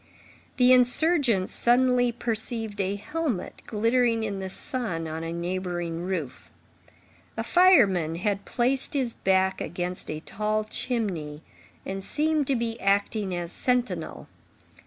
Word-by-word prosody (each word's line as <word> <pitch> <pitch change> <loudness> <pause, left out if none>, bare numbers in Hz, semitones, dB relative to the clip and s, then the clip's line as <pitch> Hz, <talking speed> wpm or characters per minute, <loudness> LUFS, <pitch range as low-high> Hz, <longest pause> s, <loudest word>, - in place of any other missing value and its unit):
The 250 0 +6
insurgents 250 - +3
suddenly 245 0 +3
perceived 225 -2 -3
a 195 +1 -1
helmet 295 - -3
glittering 230 +1 +2
in 200 -3 -3
the 190 0 -4
sun 190 - -3
on 160 +1 -5
a 165 - -4
neighboring 175 -1 -3
roof. 175 -7 -4 0.9
A - - -1
fireman 205 - +4
had 200 +3 -1
placed 260 +5 -1
his 255 -4 0
back 190 0 +1
against 180 +1 -4
a 155 - -3
tall 215 +5 -2
chimney, 190 - -3 0.4
and 195 0 -4
seemed 305 +3 0
to 275 - +2
be 230 -1 -2
acting 200 -1 0
as 175 -1 -4
sentinel. 250 +3 -2
210 Hz, 125 wpm, -26 LUFS, 180-250 Hz, 0.9 s, The